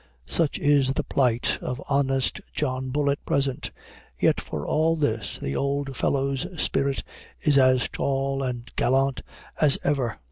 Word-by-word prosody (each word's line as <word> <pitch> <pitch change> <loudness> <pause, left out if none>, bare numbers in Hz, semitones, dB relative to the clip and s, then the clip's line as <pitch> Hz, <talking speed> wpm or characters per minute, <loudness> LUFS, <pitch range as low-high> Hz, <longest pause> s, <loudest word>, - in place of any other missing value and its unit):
Such 155 - +1
is 140 -2 +3
the - - -1
plight 125 -3 +1
of 125 - -4
honest 135 -2 +1
John 130 -2 -1
Bull 140 +1 +1
at 140 - -3
present; 135 -2 0 0.5
yet - - +3
for 75 -2 -5
all 160 +1 +2
this 115 -9 -1
the 70 0 -4
old 140 -1 -1
fellow's 135 +3 0
spirit 140 -1 0 0.4
is 150 - +3
as 130 -2 +4
tall 135 0 -1
and 125 -3 -3
as - - -24
gallant 135 +1 +2 0.4
as 150 -3 +5
ever. 130 -6 0
135 Hz, 150 wpm, -25 LUFS, 130-140 Hz, 0.5 s, as